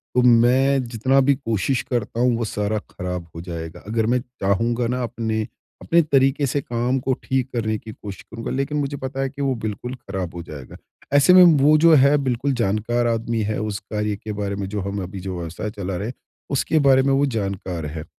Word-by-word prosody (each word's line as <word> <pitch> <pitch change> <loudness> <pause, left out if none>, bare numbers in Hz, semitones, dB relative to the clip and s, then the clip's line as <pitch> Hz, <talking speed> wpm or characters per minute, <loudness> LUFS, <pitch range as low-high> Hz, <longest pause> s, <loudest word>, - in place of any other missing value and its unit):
तो 125 - +5
मैं 125 +3 +4
जितना 125 +3 +1
भी 140 +1 +3
कोशिश 125 0 -1
करता 120 -1 -2
हूँ 125 -1 +3
वो 115 - -1
सारा 105 0 -1
खराब 90 -1 -5
हो 80 - -6
जाएगा। 85 0 -7
अगर 110 0 0
मैं 125 +3 +2 0.2
चाहूँगा 115 +5 +1
ना 125 +2 -1
अपने, 115 -1 -2 0.4
अपने 170 +1 +3
तरीके 140 -2 +2
से 140 +3 -1
काम 120 +2 -1
को 130 +1 0
ठीक 130 -1 -1
करने 110 -2 0
की 110 +1 -10
कोशिश 100 -2 -9
करूँगा 115 0 -7
लेकिन 140 +3 -1
मुझे 145 0 -2
पता 135 0 -4
है 135 - 0
कि 140 +1 -8
वो 135 -2 +1
बिल्कुल 110 +3 -5
खराब 95 -7 -6
हो 85 - -6
जाएगा। 70 -5 -10 0.4
ऐसे 145 +5 +6
में 185 0 +9 0.2
वो 155 +2 +6
जो 165 +1 +6
है 140 0 +6
बिल्कुल 135 0 0
जानकार 120 +1 0
आदमी 115 0 -1
है 105 +1 -2
उस 105 -2 -3
कार्य 105 0 -3
के 105 +2 -7
बारे 100 -1 -3
में 100 -1 -4
जो 105 -1 -3
हम 100 +1 -3
अभी 95 +2 -7
जो 95 0 -5
व्यवसाय 85 +5 -5
चला 95 -3 -4
रहे 100 +4 -3
हैं 125 - -5 0.4
उसके 150 +3 +1
बारे 135 -2 +5
में 135 0 +2
वो 140 +1 +3
जानकार 100 - -3
है। 75 +1 -5
115 Hz, 215 wpm, -22 LUFS, 100-135 Hz, 0.4 s, में